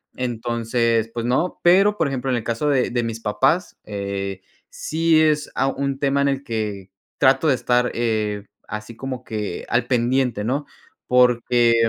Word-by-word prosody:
Entonces, 115 -1 -1
pues 115 -1 -3
no, 130 +9 0
pero, 195 +4 +5
por 165 - +1
ejemplo, 135 -1 -2
en 125 - +1
el 115 - -4
caso 120 +6 -1
de 130 -3 +1
de 120 0 0
mis 115 -1 -4
papás, 135 - 0
eh, 100 -2 -4 0.3
sí 160 0 +1
es, 150 -1 +1
ah, 135 - +1
un 140 0 -2
tema 140 0 +1
en 140 - +3
el 135 0 -2
que 105 -5 -4 0.3
trato 135 +3 +4
de 135 - +4
estar, 125 0 +1
eh, 110 -3 -1 0.2
así 110 +2 -6
como 130 0 -6
que 105 -5 -4
al 120 0 +1
pendiente, 125 -3 +1
¿no? 140 +5 -1 0.4
Porque 125 -1 +4
125 Hz, 165 wpm, -22 LUFS, 115-135 Hz, 0.4 s, pero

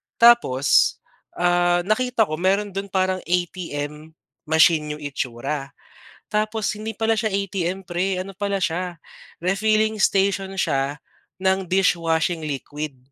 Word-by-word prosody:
tapos, 235 - +5 0.4
ah, 175 0 +2
nakita 230 +3 +2
ko 155 -5 -4
meron 195 +3 +1
dun 195 +1 -4
parang 185 -1 0
ATM 160 -3 -3 0.3
machine 160 -1 +3
yung 150 - -11
itsura 135 +1 -4 0.5
tapos 215 0 -1
hindi 215 0 -6
pala 225 0 +2
siya 220 0 0
ATM 195 -2 -2
pre 185 +2 -1
ano 190 +2 -5
pala 200 +1 -2
siya 175 -1 -2 0.4
refilling 215 +4 +1
station 195 0 +1
siya 140 -4 0 0.4
ng 190 -1 0
dishwashing 170 -3 +1
liquid. 145 -1 -5
185 Hz, 120 wpm, -22 LUFS, 160-200 Hz, 0.5 s, tapos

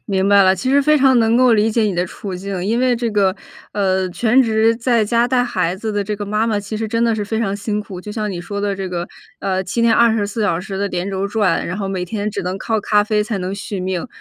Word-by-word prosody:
明 195 -2 0
白 200 0 +6
了。 190 0 +5
其 195 +8 -2
实 280 +1 +5
非 305 +2 +4
常 265 -3 +4
能 225 0 +3
够 250 -1 +5
理 220 0 +3
解 225 +1 +1
你 210 -3 0
的 175 +1 0
处 195 +2 -7
境， 185 0 -4
因 225 +4 0
为 255 0 +2
这 235 -1 -2
个， 200 -3 +2 0.4
呃， 190 -2 0
全 235 +7 +3
职 225 -2 +3
在 235 -2 +1
家 235 +3 +2
带 250 0 +2
孩 180 -7 -1
子 215 +3 -4
的 205 -1 -1
这 210 +1 -3
个 205 0 -5
妈 210 +2 0
妈 220 -2 0
其 205 +2 -6
实 220 +1 -2
真 230 +1 -1
的 230 -1 +3
是 210 -1 -2
非 220 +2 -2
常 200 -3 -1
辛 210 0 -2
苦， 195 -3 -8
就 210 +3 -8
像 210 -1 -3
你 180 -3 -5
说 200 +3 -5
的 200 -1 -1
这 190 -1 -4
个， 175 -1 -3 0.3
呃， 190 -1 -1
7 230 +6 -1
天 230 -1 +4
24 220 -2 +2
小 175 -5 +1
时 190 +1 -6
的 200 - 0
连 180 +1 -3
轴 195 0 -2
转， 205 -4 0
然 180 - -4
后 200 -2 -3
每 185 -2 -2
天 210 +3 -3
只 200 - -4
能 185 +1 -3
靠 220 +2 -1
咖 210 0 +2
啡 210 0 0
才 215 0 -3
能 185 0 -3
续 200 -1 -5
命。 185 -2 -3
205 Hz, 290 characters per minute, -19 LUFS, 190-225 Hz, 0.4 s, 白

